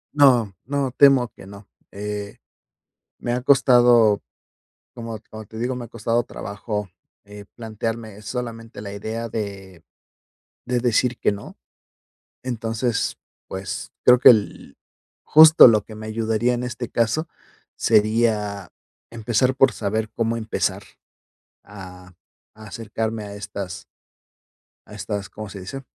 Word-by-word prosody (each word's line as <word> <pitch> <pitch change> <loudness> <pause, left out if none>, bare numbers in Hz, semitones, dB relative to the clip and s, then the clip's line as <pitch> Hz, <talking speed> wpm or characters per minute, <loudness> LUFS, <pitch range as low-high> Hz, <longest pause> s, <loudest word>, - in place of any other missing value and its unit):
No, 125 -8 +4
no, 140 -1 -1
temo 135 -2 +5
que 95 - -15
no. 100 0 -13 0.2
Eh, 105 0 -6 0.8
me 120 - -3
ha 125 +1 -2
costado, 120 -5 +5 0.7
como 115 -2 -7
como 110 0 -9
te 110 - -12
digo, 125 +3 -2
me 125 - -6
ha - - -12
costado 115 +1 -1
trabajo, 105 -1 -6 0.4
eh, 105 0 -11
plantearme 110 -1 -5
solamente 115 -1 -6
la 100 -1 -7
idea 110 +3 -5
de 100 -5 -7 0.8
de 125 0 -1
decir 120 0 +1
que - - +2
no, 100 0 -9 0.9
entonces, 115 -1 -2 0.3
pues, 95 -1 -6
creo 125 0 +7
que - - +8
el 105 - 0 0.5
justo 155 -3 +8
lo 110 -2 +3
que 110 - -12
me 110 0 -9
ayudaría 110 +2 0
en 120 +1 -3
este 120 -1 -5
caso, 120 +9 0 0.5
sería 105 -3 +1 0.4
empezar 120 +3 0
por 135 0 +4
saber 110 +1 -2
cómo 115 0 -1
empezar 110 -1 -2 0.8
a 90 -2 -12 0.4
acercarme 110 0 -5
a 100 - -8
estas 100 -3 -7 1.0
a - - -14
estas, 100 -1 -5
¿cómo 110 -1 -8
se 100 0 -9
dice?, 135 +9 -7
110 Hz, 125 wpm, -22 LUFS, 105-120 Hz, 1.0 s, que